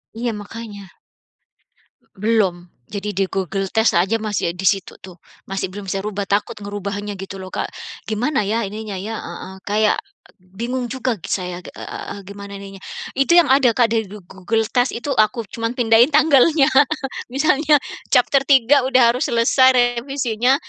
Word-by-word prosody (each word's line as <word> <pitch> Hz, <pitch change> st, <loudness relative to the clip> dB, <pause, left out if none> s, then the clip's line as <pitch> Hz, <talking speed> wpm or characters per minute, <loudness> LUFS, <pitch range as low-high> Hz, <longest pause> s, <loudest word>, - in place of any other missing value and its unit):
Iya, 235 Hz, +1 st, -2 dB
makanya. 205 Hz, -1 st, -8 dB, 1.3 s
Belum. 190 Hz, -4 st, 0 dB, 0.2 s
Jadi 205 Hz, 0 st, -4 dB
di 195 Hz, 0 st, 0 dB
Google 195 Hz, +1 st, -2 dB
Test 220 Hz, +3 st, +2 dB
aja 195 Hz, +5 st, +1 dB
masih, 215 Hz, -5 st, -1 dB
eee, 170 Hz, -, -3 dB
di 185 Hz, -, -7 dB
situ 195 Hz, -1 st, +1 dB
tuh, 180 Hz, -2 st, -12 dB, 0.2 s
masih 195 Hz, 0 st, -3 dB
belum 195 Hz, +1 st, -7 dB
saya 195 Hz, -, -1 dB
rubah, 205 Hz, -1 st, -3 dB
takut 205 Hz, +3 st, -1 dB
ngerubahnya 205 Hz, -1 st, -5 dB
gitu 195 Hz, 0 st, -7 dB
loh, 185 Hz, -1 st, -8 dB
Kak. -, -, -2 dB, 0.4 s
Gimana 215 Hz, 0 st, 0 dB
ya 230 Hz, +2 st, 0 dB
ininya 210 Hz, 0 st, -5 dB
ya, 215 Hz, +4 st, -5 dB
heeh, 190 Hz, -, -8 dB
kayak, 210 Hz, +1 st, +2 dB, 0.3 s
eee, -, -, -47 dB, 0.2 s
bingung 245 Hz, +3 st, -3 dB
juga 255 Hz, -4 st, -2 dB
g -, -, -9 dB
saya, 180 Hz, -2 st, -3 dB
eee, 180 Hz, -, -8 dB
gimana 200 Hz, +1 st, -9 dB
ininya. 195 Hz, 0 st, -10 dB, 0.3 s
Itu 275 Hz, +6 st, +2 dB
yang 335 Hz, -6 st, +5 dB
ada, 260 Hz, -4 st, +4 dB
Kak, 235 Hz, -3 st, +3 dB
di 220 Hz, -3 st, 0 dB
Go 205 Hz, -1 st, -11 dB
Google 190 Hz, +5 st, -2 dB
Test 245 Hz, -1 st, +1 dB
itu 260 Hz, +4 st, -4 dB
aku 220 Hz, +1 st, +2 dB
cuman 230 Hz, +1 st, -3 dB
pindahin 235 Hz, 0 st, +5 dB
tanggalnya. 300 Hz, -1 st, +5 dB, 0.6 s
Misalnya 290 Hz, +3 st, +2 dB, 0.3 s
chapter 255 Hz, +2 st, +4 dB
3 270 Hz, 0 st, +5 dB
udah 250 Hz, -3 st, +5 dB
harus 250 Hz, -, -1 dB
selesai 255 Hz, +3 st, +4 dB, 0.2 s
revisinya, 255 Hz, -1 st, +1 dB
215 Hz, 160 wpm, -20 LUFS, 195-245 Hz, 1.3 s, yang